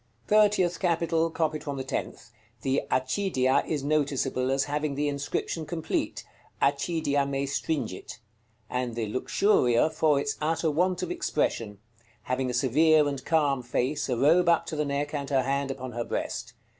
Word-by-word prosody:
THIRTIETH 205 -4 +3
CAPITAL. 165 -2 +1
Copied 155 -2 -1
from 145 -3 -4
the 130 - -3
tenth. 130 - -5 0.3
The 135 +1 +1
"Accidia" 130 0 +1
is 150 -4 -2
noticeable 140 -3 0
as 135 0 +2
having 145 0 -2
the 145 +1 0
inscription 145 +3 -2
complete, 160 +1 -3 0.3
"ACCIDIA 145 0 +1
ME 140 0 -1
STRINGIT;" 135 -7 -3 0.5
and 125 -1 -3
the 115 -1 -1
"Luxuria" 130 - +2
for 150 -3 +2
its 215 +9 -2
utter 160 +1 +1
want 180 +4 +1
of - - -3
expression, 115 - -1 0.5
having 130 +1 -1
a - - -2
severe 150 +4 +4
and 140 -2 -4
calm 145 -5 +2
face, 130 +5 -1
a 125 - 0
robe 165 +7 +4
up 170 0 +3
to 160 - -5
the 150 0 0
neck, 145 +1 -2
and 140 -2 -3
her 135 -2 +2
hand 140 +1 -1
upon 130 -2 -5
her 120 0 -3
breast. - - -4
145 Hz, 160 wpm, -27 LUFS, 130-160 Hz, 0.5 s, severe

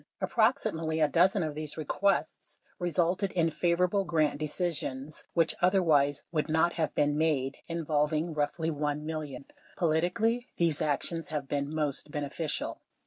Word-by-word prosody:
Approximately 205 -9 +1
a 155 - +5
dozen 180 +4 +3
of 155 -1 -2
these 155 0 -4
requests 195 +6 -1 0.2
resulted 175 +2 +1
in 165 -2 +2
favorable 180 +5 +2
grant 155 -5 +1
decisions 155 -3 -3
(which 165 -2 +3
otherwise 160 -7 +3
would 155 -1 -1
not 160 +2 +3
have 160 -3 -1
been 145 0 +2
made) 145 -4 +1
involving 155 0 0
roughly 155 +2 -1
$1 150 0 -1
million. 150 -4 -5 0.3
Politically 190 +9 +1
these 165 -3 +1
actions 155 +2 -1
have 150 -3 -3
been 140 +1 -2
most 150 -2 -2
beneficial. 150 +2 -3
160 Hz, 135 wpm, -30 LUFS, 150-175 Hz, 0.3 s, a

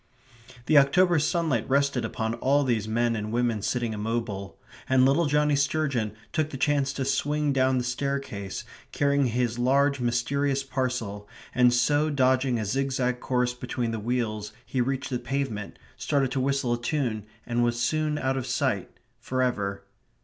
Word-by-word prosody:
The 150 +1 +6
October 175 +5 +4
sunlight 150 -6 0
rested 140 -2 +2
upon 110 0 -2
all 140 +4 +2
these 115 -5 0
men 115 +1 +1
and 105 0 -4
women 120 -2 0
sitting 120 +1 -1
immobile; 105 -3 -3 0.3
and 130 -1 +5
little 145 +5 +3
Johnnie 150 0 +2
Sturgeon 140 -6 0 0.2
took 155 -2 0
the 135 - -6
chance 140 0 +1
to 135 - -2
swing 145 +2 0
down 130 -1 +2
the 125 - 0
staircase, 125 -6 -3 0.3
carrying 140 -1 +2
his 120 0 -1
large 140 +3 +3
mysterious 135 +3 0
parcel, 125 -6 -3 0.2
and 125 -1 +5
so 145 +5 +2
dodging 130 -2 +2
a 110 - -2
zigzag 125 +1 0
course 125 -1 0
between 125 -1 -3
the 115 - -3
wheels 110 -2 -2
he 125 +2 -1
reached 130 +1 -2
the 125 - -1
pavement, 125 -8 -3 0.2
started 140 -3 0
to 135 - -1
whistle 135 -2 +1
a 120 - -3
tune 120 -6 -2 0.2
and 120 0 0
was 120 0 0
soon 150 +5 0
out 135 -1 0
of 130 - -3
sight - - 0 0.3
for 130 0 -1
ever. 100 -6 -2
130 Hz, 165 wpm, -26 LUFS, 120-140 Hz, 0.3 s, The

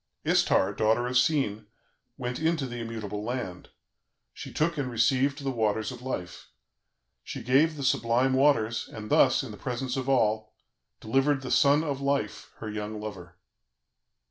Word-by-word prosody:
"Istar, 95 +2 +3
daughter 110 +4 +2
of 125 +1 -3
Sin, 125 -6 +1 0.5
went 125 0 -4
into 160 -2 +1
the 120 -1 -6
immutable 110 -3 -5
land, 110 -7 -5 0.6
she - - -8
took 165 +2 0
and 130 -2 -1
received 130 +5 +1
the 135 - -1
Waters 110 -1 0
of 125 -1 -9
Life. 90 -9 -5 0.8
She - - -7
gave 140 +6 +3
the 140 - -4
sublime 125 +1 +2
Waters, 130 -5 +2
and 105 -1 -8
thus, - - +4
in - - -7
the - - -9
presence 125 0 -3
of 130 0 -2
all, 110 -4 +1 0.4
delivered 135 +4 +1
the 130 - -5
SON 145 +3 +4
OF 140 -3 -3
LIFE, 140 -6 -2
her 110 - -7
young 105 0 -5
lover." 95 -5 -8
125 Hz, 155 wpm, -28 LUFS, 110-135 Hz, 0.8 s, thus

